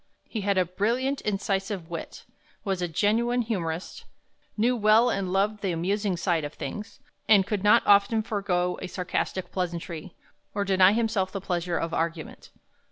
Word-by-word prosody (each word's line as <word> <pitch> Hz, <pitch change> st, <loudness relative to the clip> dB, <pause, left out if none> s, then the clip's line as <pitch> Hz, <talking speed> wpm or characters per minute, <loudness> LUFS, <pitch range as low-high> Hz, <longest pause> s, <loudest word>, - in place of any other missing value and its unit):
He 220 Hz, -, -4 dB
had 200 Hz, 0 st, +1 dB
a 185 Hz, -, +3 dB
brilliant, 235 Hz, +10 st, -1 dB
incisive 195 Hz, -3 st, -2 dB
wit; 165 Hz, -, -7 dB, 0.4 s
was 195 Hz, -3 st, -2 dB
a 175 Hz, -, 0 dB
genuine 230 Hz, +8 st, +1 dB
humorist; 175 Hz, -6 st, -4 dB, 0.5 s
knew 240 Hz, +4 st, +2 dB
well 220 Hz, +2 st, +4 dB
and 190 Hz, -2 st, -2 dB
loved 205 Hz, +2 st, +1 dB
the 195 Hz, -3 st, 0 dB
amusing 190 Hz, +3 st, -1 dB
side 170 Hz, -2 st, 0 dB
of 145 Hz, +1 st, -6 dB
things; 210 Hz, +1 st, -7 dB, 0.3 s
and 200 Hz, -3 st, +6 dB
could 205 Hz, -1 st, -2 dB
not 210 Hz, -, +5 dB
often 205 Hz, +2 st, +4 dB
forego 185 Hz, -5 st, -1 dB
a 185 Hz, -, -4 dB
sarcastic 180 Hz, +1 st, -3 dB
pleasantry, 170 Hz, -1 st, -4 dB, 0.4 s
or 200 Hz, -1 st, 0 dB
deny 190 Hz, 0 st, +5 dB
himself 215 Hz, -4 st, 0 dB
the 195 Hz, -, -4 dB
pleasure 175 Hz, -2 st, -2 dB
of 165 Hz, 0 st, -3 dB
argument. 165 Hz, -1 st, -3 dB
195 Hz, 160 wpm, -26 LUFS, 180-210 Hz, 0.5 s, and